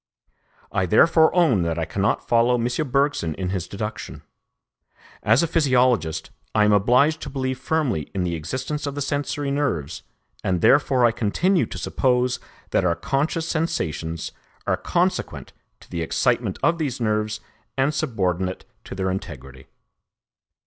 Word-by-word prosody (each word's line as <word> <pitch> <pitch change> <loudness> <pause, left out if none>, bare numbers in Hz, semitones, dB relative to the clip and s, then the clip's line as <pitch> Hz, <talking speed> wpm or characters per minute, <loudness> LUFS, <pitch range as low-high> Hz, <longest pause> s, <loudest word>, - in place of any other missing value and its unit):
I 95 - 0
therefore 160 - +5
own 160 - +4
that 85 -1 -1
I 80 - -1
cannot 95 +5 -1
follow 120 +1 +4
M. 120 0 0 0.2
Bergson 140 - +1
in 95 -1 -3
his 90 -2 -3
deduction. 105 +2 -6 1.0
As 115 +8 +4
a - - +1
physiologist, 125 - +1 0.2
I 105 - +5
am 105 - +4
obliged 125 +10 +3
to - - -5
believe 130 -1 -3
firmly 130 - -1
in 95 - 0
the 85 -1 -1
existence 130 - -4
of 140 - -4
the 145 - -3
sensory 145 0 -2
nerves, 110 - -2 0.4
and 90 -2 0
therefore 135 -3 +4
I 120 - +5
continue 165 - +1
to - - -7
suppose 125 -1 +1 0.3
that - - +2
our 85 -2 +2
conscious 140 - -1
sensations 85 - -2 0.3
are - - +2
consequent - - -1 0.3
to - - -18
the 85 - -3
excitement 120 +4 0
of 170 0 +2
these 140 -5 -2
nerves 105 -1 -1 0.4
and 135 +3 +2
subordinate 95 - -1 0.2
to - - -7
their 95 0 -1
integrity. 70 -7 -7
120 Hz, 150 wpm, -23 LUFS, 90-140 Hz, 1.0 s, therefore